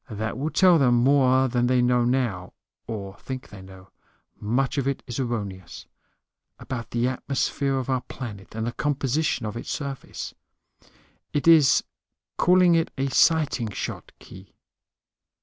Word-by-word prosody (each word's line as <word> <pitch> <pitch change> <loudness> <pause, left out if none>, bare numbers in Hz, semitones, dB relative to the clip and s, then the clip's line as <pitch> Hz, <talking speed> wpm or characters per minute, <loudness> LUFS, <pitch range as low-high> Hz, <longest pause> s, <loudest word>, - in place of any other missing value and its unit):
That 110 0 -4
will 140 +6 -2
tell 180 -1 +5
them 125 -3 +4
more 130 +1 +4
than 120 0 0
they 125 0 +3
know 125 0 +3
now 120 -8 -1 0.3
(or 100 -3 -6
think 130 -1 -7
they 100 -2 -11
know; 95 0 -14 0.5
much 125 +6 0
of 135 - -2
it 140 - -2
is 120 -1 -5
erroneous) 100 -7 -5 0.7
about 125 -3 -6
the 120 +1 0
atmosphere 135 +1 -1
of 130 - -3
our 130 -2 0
planet 110 -6 -9
and 110 0 -2
the 120 - -2
composition 145 -1 -1
of 105 0 -5
its 120 - -6
surface. 140 -3 -5 1.0
It 145 +2 -1
is 160 -5 +6 0.5
call 180 +1 +4
it 165 -2 +3
a 135 +1 0
sighting 150 -9 +2
shot, 105 - -6
Khee. 95 +1 -15
125 Hz, 150 wpm, -25 LUFS, 110-140 Hz, 1.0 s, is